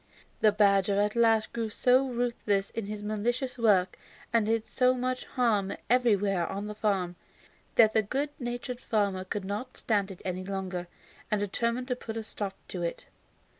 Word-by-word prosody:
The 215 Hz, -, +5 dB
badger 200 Hz, -1 st, +3 dB
at 210 Hz, +2 st, +1 dB
last 225 Hz, -2 st, +3 dB
grew 230 Hz, -2 st, -2 dB
so 255 Hz, +5 st, +3 dB
ruthless 235 Hz, -5 st, -1 dB
in 225 Hz, -3 st, -4 dB
his 210 Hz, 0 st, -5 dB
mischievous 240 Hz, +5 st, -2 dB
work, 195 Hz, -5 st, +3 dB, 0.3 s
and 225 Hz, -2 st, +3 dB
did 225 Hz, 0 st, +1 dB
so 255 Hz, 0 st, +2 dB
much 255 Hz, 0 st, -2 dB
harm 215 Hz, -6 st, +1 dB, 0.2 s
everywhere 205 Hz, -8 st, +3 dB
on 200 Hz, +1 st, -4 dB
the 210 Hz, -, -5 dB
farm, 195 Hz, -5 st, -1 dB, 0.6 s
that 220 Hz, -1 st, +6 dB
the 220 Hz, -, +4 dB
good 270 Hz, +8 st, -2 dB
natured 245 Hz, 0 st, -4 dB
farmer 200 Hz, -4 st, 0 dB
could 190 Hz, +1 st, -4 dB
not 210 Hz, +6 st, -4 dB
stand 205 Hz, -3 st, 0 dB
it 190 Hz, -, -10 dB
any 185 Hz, 0 st, -2 dB
longer, 185 Hz, -2 st, -4 dB, 0.4 s
and 210 Hz, -, +1 dB
determined 235 Hz, +5 st, -1 dB
to 250 Hz, -, +1 dB
put 225 Hz, -2 st, -6 dB
a 225 Hz, -, -3 dB
stop 205 Hz, -2 st, -5 dB
to 180 Hz, -, -4 dB
it. 170 Hz, -1 st, -3 dB
215 Hz, 170 wpm, -29 LUFS, 195-240 Hz, 0.6 s, that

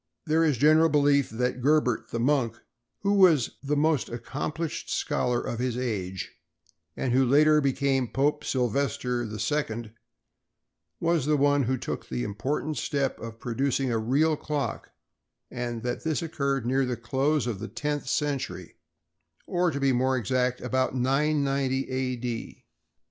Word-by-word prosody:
There 160 Hz, +1 st, +3 dB
is 150 Hz, -5 st, +2 dB
a -, -, -12 dB
general 155 Hz, +3 st, +5 dB
belief 145 Hz, -2 st, +3 dB
that 125 Hz, +3 st, -2 dB
Gerbert, 140 Hz, -3 st, +2 dB
the 115 Hz, -, -3 dB
monk, 120 Hz, -3 st, +1 dB, 0.4 s
who 200 Hz, 0 st, +2 dB
was 175 Hz, -, +4 dB
the 145 Hz, +1 st, -1 dB
most 155 Hz, -3 st, +2 dB
accomplished 145 Hz, +7 st, -4 dB
scholar 125 Hz, -1 st, 0 dB
of 120 Hz, -, -4 dB
his 125 Hz, -1 st, -1 dB
age, 95 Hz, -7 st, -3 dB, 0.7 s
and 125 Hz, -, -1 dB
who 130 Hz, +1 st, +4 dB
later 150 Hz, +4 st, +5 dB
became 135 Hz, -2 st, +1 dB
Pope 145 Hz, +5 st, 0 dB
Sylvester 125 Hz, 0 st, 0 dB
II, 110 Hz, +1 st, -2 dB, 1.1 s
was 165 Hz, -4 st, +1 dB
the 150 Hz, -1 st, +3 dB
one 145 Hz, 0 st, +3 dB
who 130 Hz, -, 0 dB
first 130 Hz, -, -8 dB
took -, -, -5 dB
the -, -, -2 dB
important 140 Hz, -, -2 dB
step 140 Hz, -2 st, -1 dB
of 115 Hz, 0 st, -8 dB
producing 130 Hz, +2 st, -1 dB
a 115 Hz, -, +1 dB
real 145 Hz, +8 st, +2 dB
clock, 145 Hz, -5 st, -3 dB, 0.6 s
and 120 Hz, -2 st, -4 dB
that 120 Hz, 0 st, -3 dB
this 160 Hz, +1 st, -1 dB
occurred 140 Hz, -6 st, -1 dB
near 130 Hz, +2 st, +2 dB
the 125 Hz, -2 st, -2 dB
close 135 Hz, +4 st, 0 dB
of 115 Hz, -6 st, -3 dB
the 110 Hz, -, -5 dB
tenth 150 Hz, +2 st, -3 dB
century—or 135 Hz, -, -4 dB
to 140 Hz, -3 st, -3 dB
be 135 Hz, -1 st, +3 dB
more 130 Hz, +1 st, +2 dB
exact, 125 Hz, +2 st, 0 dB
about 130 Hz, 0 st, 0 dB
990 135 Hz, 0 st, +1 dB
A. 130 Hz, -1 st, -1 dB
D. 120 Hz, -1 st, -6 dB
135 Hz, 150 wpm, -27 LUFS, 120-150 Hz, 1.1 s, general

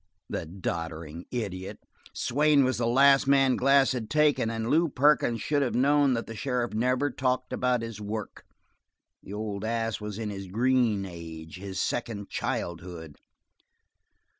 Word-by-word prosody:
The 85 Hz, -, -3 dB
doddering 80 Hz, -2 st, -5 dB
idiot! 95 Hz, -6 st, -4 dB, 0.3 s
Swain 145 Hz, +2 st, +3 dB
was 130 Hz, -2 st, 0 dB
the 115 Hz, -, +1 dB
last 135 Hz, +3 st, +5 dB
man 135 Hz, -2 st, +4 dB
Glass 135 Hz, 0 st, +4 dB
had 120 Hz, -4 st, -4 dB
taken, 150 Hz, -6 st, +3 dB
and 115 Hz, 0 st, -3 dB
Lew 165 Hz, +5 st, +3 dB
Perkins 130 Hz, -5 st, +2 dB
should 145 Hz, -1 st, +1 dB
have 130 Hz, -, 0 dB
known 140 Hz, 0 st, +3 dB
that 115 Hz, -, -3 dB
the 115 Hz, -, -8 dB
sheriff 125 Hz, -1 st, -2 dB
never 125 Hz, +5 st, +1 dB
talked 130 Hz, -1 st, -1 dB
about 125 Hz, -2 st, +1 dB
his 115 Hz, -2 st, -7 dB
work; 105 Hz, 0 st, -5 dB, 0.8 s
the 100 Hz, -, -10 dB
old 105 Hz, -1 st, -4 dB
ass 115 Hz, 0 st, -2 dB
was 105 Hz, -1 st, -5 dB
in 110 Hz, -2 st, -3 dB
his 95 Hz, -1 st, -7 dB
green 115 Hz, -1 st, +1 dB
age, 80 Hz, -2 st, -9 dB
his 95 Hz, 0 st, -6 dB
second 110 Hz, -4 st, -3 dB
childhood. 85 Hz, -3 st, -4 dB
115 Hz, 150 wpm, -27 LUFS, 100-130 Hz, 0.8 s, last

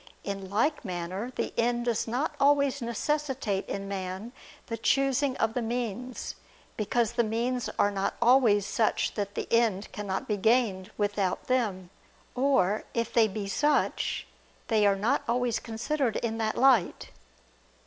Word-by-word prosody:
In 195 Hz, -1 st, -5 dB
like 235 Hz, +10 st, +1 dB
manner, 185 Hz, +4 st, -4 dB
the -, -, -2 dB
end 240 Hz, +1 st, +1 dB
does 235 Hz, -2 st, 0 dB
not 265 Hz, +7 st, -1 dB
always 280 Hz, -1 st, +3 dB
necessitate 240 Hz, -3 st, -2 dB
in 200 Hz, 0 st, -4 dB
man 190 Hz, +3 st, -5 dB, 0.3 s
the 230 Hz, -, -4 dB
choosing 270 Hz, +3 st, +1 dB
of 225 Hz, 0 st, +1 dB
the 245 Hz, -, -1 dB
means, 240 Hz, +1 st, -3 dB, 0.4 s
because 225 Hz, +2 st, 0 dB
the 235 Hz, 0 st, +2 dB
means 235 Hz, +3 st, -1 dB
are 205 Hz, -, +3 dB
not 195 Hz, -1 st, -1 dB
always 235 Hz, -5 st, +5 dB
such 215 Hz, +2 st, 0 dB
that 200 Hz, -1 st, -4 dB
the -, -, -3 dB
end 220 Hz, -4 st, +2 dB
cannot 200 Hz, -2 st, -4 dB
be 210 Hz, -, 0 dB
gained 210 Hz, -3 st, +2 dB
without 205 Hz, -3 st, -1 dB
them; 205 Hz, -8 st, -1 dB, 0.4 s
or, 245 Hz, -7 st, +2 dB
if 230 Hz, 0 st, -1 dB
they 225 Hz, -2 st, +5 dB
be 205 Hz, 0 st, -5 dB
such, 295 Hz, +8 st, 0 dB, 0.4 s
they 215 Hz, -3 st, +4 dB
are 200 Hz, -, +4 dB
not 225 Hz, +8 st, +1 dB
always 240 Hz, -1 st, +1 dB
considered 235 Hz, +2 st, -2 dB
in 225 Hz, -1 st, -2 dB
that 220 Hz, -1 st, -1 dB
light. 250 Hz, -8 st, +3 dB
225 Hz, 150 wpm, -28 LUFS, 200-250 Hz, 0.4 s, always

